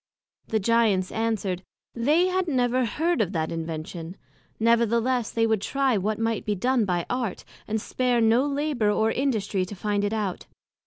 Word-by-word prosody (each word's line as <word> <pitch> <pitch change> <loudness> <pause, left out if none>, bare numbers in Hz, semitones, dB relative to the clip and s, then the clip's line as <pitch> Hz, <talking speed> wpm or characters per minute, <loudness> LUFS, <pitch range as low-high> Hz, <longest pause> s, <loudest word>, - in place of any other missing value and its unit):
The 220 - 0
Giants 210 -3 +2
answered, 215 -5 -1 0.3
They 295 +9 +3
had 370 0 0
never 255 -3 +1
heard 320 +4 0
of 200 -2 -1
that 160 -2 -1
Invention; 165 +2 -5 0.4
nevertheless, 235 +1 +2
they 225 0 +1
would 220 -3 +1
try 270 +2 +1
what 210 +2 -1
might 225 -1 -1
be 210 - -1
done 245 +3 +1
by 175 -3 -1
Art, 245 -5 -3 0.2
and 220 +1 -1
spare 250 +2 0
no 230 +3 +4
labour 285 -6 0
or 220 +1 +2
industry 215 -8 0
to 185 +3 -6
find 205 +2 -1
it 205 - 0
out. 210 -5 -3
225 Hz, 165 wpm, -25 LUFS, 200-250 Hz, 0.4 s, no